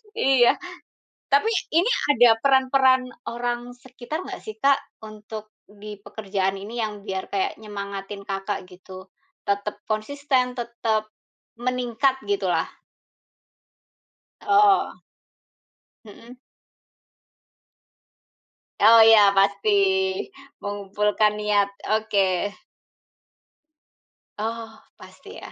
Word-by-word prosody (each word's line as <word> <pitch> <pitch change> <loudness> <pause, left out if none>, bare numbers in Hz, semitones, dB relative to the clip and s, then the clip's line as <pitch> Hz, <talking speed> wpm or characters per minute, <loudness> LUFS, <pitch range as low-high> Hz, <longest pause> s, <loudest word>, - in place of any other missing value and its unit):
Iya. 260 -3 +3 0.7
Tapi, 425 +1 +3 0.3
ini 385 +9 +3 0.2
ada 235 -5 +5
peran-peran 265 -1 +3 0.2
orang 240 +1 -4
sekitar 260 +7 -7
enggak - - -7
sih 215 0 -9
Kak, 275 +3 +3 0.2
untuk 215 0 -10 0.2
di 210 0 -11
pekerjaan 195 -2 -3
ini 220 +5 -6
yang 210 -2 -4
biar 190 -2 -4
kayak 385 - -2
nyemangatin 200 -1 -7
Kakak 195 0 -4
gitu? 185 +1 -13 0.3
Tetap 200 +1 -3
konsisten, 255 +3 -1
tetap 225 -3 -2 0.5
meningkat 250 +1 0
gitu 405 -1 -1
lah. - - +1 1.8
Oh. 405 -1 +4 1.1
Mhm. 230 +4 -14 2.4
Oh 225 +2 +7
iya 220 -2 +8 0.2
pasti, 200 +1 +2 0.9
mengumpulkan 205 +1 0
niat. 210 -1 +1 0.3
Oke. 200 -4 0 1.9
Oh, 225 +1 -5 0.2
pasti - - -14
ya. - - -10
220 Hz, 85 wpm, -23 LUFS, 205-250 Hz, 2.4 s, iya